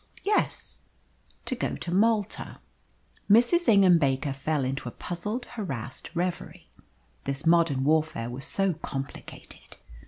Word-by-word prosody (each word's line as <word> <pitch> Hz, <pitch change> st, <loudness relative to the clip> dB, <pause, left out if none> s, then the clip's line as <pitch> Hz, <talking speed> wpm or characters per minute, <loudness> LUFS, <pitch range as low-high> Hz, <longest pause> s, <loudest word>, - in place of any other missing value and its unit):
"Yes, 415 Hz, +1 st, 0 dB, 0.6 s
to -, -, -1 dB
go 250 Hz, -, -2 dB
to 175 Hz, -, -5 dB
Malta." 215 Hz, +1 st, +1 dB, 0.7 s
Mrs. 240 Hz, -, +5 dB
Ingham 195 Hz, -5 st, +6 dB
Baker 140 Hz, -1 st, 0 dB
fell 140 Hz, 0 st, -1 dB
into 130 Hz, -1 st, -3 dB
a -, -, -11 dB
puzzled, 205 Hz, -, -4 dB
harassed 135 Hz, -, -6 dB
reverie. 175 Hz, +1 st, -4 dB, 0.5 s
This 140 Hz, +3 st, -2 dB
modern 165 Hz, -5 st, +3 dB
warfare 150 Hz, -6 st, +1 dB
was 135 Hz, +4 st, -4 dB
so 195 Hz, +2 st, +1 dB
complicated. 135 Hz, -3 st, -8 dB
165 Hz, 120 wpm, -27 LUFS, 135-200 Hz, 0.7 s, Ingham